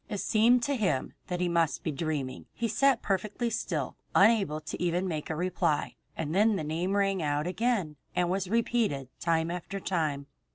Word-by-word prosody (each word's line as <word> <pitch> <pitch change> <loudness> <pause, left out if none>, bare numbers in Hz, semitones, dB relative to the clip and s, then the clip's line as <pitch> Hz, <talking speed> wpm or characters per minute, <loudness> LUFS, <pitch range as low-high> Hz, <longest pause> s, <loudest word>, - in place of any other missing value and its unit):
It 210 - -3
seemed 235 +5 +4
to 285 - +1
him 185 - 0
that 180 0 -2
he 180 - +2
must 170 -2 +1
be 160 - -1
dreaming. 140 -3 -3
He 235 - -1
sat 260 +3 +3
perfectly 210 +4 -1
still 155 - -2 0.2
listening, 205 +4 +8
unable 155 -5 -3 0.2
even 175 +1 +1
to - - -2
make 155 -4 -3
a 160 - -1
reply, 175 -2 0 0.2
and 160 -1 -2
then 210 +3 +4
the 160 - -2
name 165 +5 -1
rang 195 -2 +2
out 145 0 0
again 185 -5 0 0.2
and 180 - +2
was 185 +1 -1
repeated 220 - 0
time 165 0 +1
after 180 +3 -5
time. 155 -7 -1
180 Hz, 190 wpm, -29 LUFS, 155-205 Hz, 0.2 s, listening